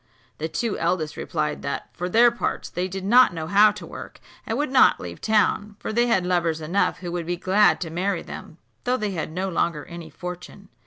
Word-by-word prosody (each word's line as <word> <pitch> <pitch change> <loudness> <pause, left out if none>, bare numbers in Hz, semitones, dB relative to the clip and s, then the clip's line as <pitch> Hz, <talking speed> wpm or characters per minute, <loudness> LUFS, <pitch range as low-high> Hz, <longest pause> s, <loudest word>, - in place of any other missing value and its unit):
The 160 - -2
two 225 +6 -2
eldest 165 -2 -1
replied 150 -2 -3
that, 140 - -4
for 180 +1 -4
their 235 +5 +6
parts, 235 - -3
they 180 +1 -2
did 190 0 -6
not 240 -3 +5
know 160 -1 -4
how 200 +5 +6
to 210 - -9
work, - - -10 0.3
and 225 - -1
would 290 -2 -1
not 260 -1 +5
leave 85 -1 -8
town; 210 -1 +1
for 220 - -5
they 240 +2 +3
had 190 -6 +2
lovers 170 -3 +1
enough 170 +4 0
who 175 -2 -5
would 170 -1 -4
be 175 0 -1
glad 190 +4 +3
to 165 -3 -4
marry 185 +4 -1
them, - - -10 0.3
though 250 +1 +1
they 210 -4 -2
had 160 -4 -4
no 185 +4 -2
longer 170 -5 -1
any 170 -2 -9
fortune. 180 +2 -9
180 Hz, 215 wpm, -24 LUFS, 165-210 Hz, 0.3 s, their